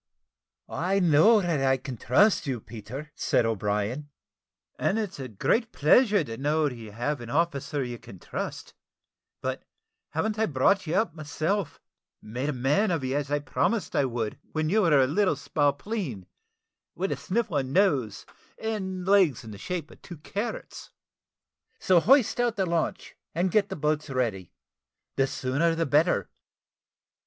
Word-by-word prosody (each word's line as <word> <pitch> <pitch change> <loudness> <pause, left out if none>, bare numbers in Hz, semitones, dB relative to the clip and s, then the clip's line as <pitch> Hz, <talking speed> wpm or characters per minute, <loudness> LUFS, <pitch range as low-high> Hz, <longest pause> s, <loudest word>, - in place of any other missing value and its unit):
"I 190 +4 0
know 180 +6 +5
that 170 -6 0
I 135 0 +3
can 130 0 -7
trust 160 - +3
you, 130 -3 -1
Peter," 115 +8 -9
said - - +1
O'Brien, 110 +6 -1 0.7
"and 205 - +1
it's 205 -7 -3
a 130 - -4
great 220 - 0
pleasure 205 - +4
to 115 -5 -7
know 150 +2 +1
that 130 - -4
you 110 -3 -10
have 120 +5 -2
an 120 - -8
officer 145 -1 0
you 120 -2 -6
can 95 - -12
trust - - -6 0.7
but - - -3 0.5
hav'n't 215 +7 -1
I 220 - +2
brought 165 +7 +2
you 160 - -1
up 190 -4 +1
myself, 155 +3 -2 0.4
and 105 - -13
made 130 +4 -1
a - - +2
man 145 - +1
of 165 -6 -1
you, 130 +1 -1
as 145 -1 -1
I 145 - +2
promised 185 +10 -1
I 140 - +3
would, 115 -4 -3
when 155 0 0
you 215 +5 +3
were 160 -7 +4
a 130 - +5
little 175 +5 +2
spalpeen, 145 - -2 0.7
with 190 +3 -2
a - - +1
sniffling 180 - -1
nose, 140 - +1 0.3
and 190 -5 -3
legs 190 - +4
in 110 - -9
the 100 - -10
shape 170 - -4
of - - -17
two 175 - -10
carrots? 200 +9 -5 0.9
So 185 -2 +4
hoist 250 - +4
out 240 -2 +1
the 195 - 0
launch, 170 -2 -2 0.2
and 180 +2 +1
get 205 +1 +2
the 190 - -4
boats 150 -1 -1
ready 115 -9 -2 0.6
the 135 - +2
sooner 145 +7 0
the 165 0 0
better. 145 - +2
150 Hz, 165 wpm, -27 LUFS, 130-190 Hz, 0.9 s, know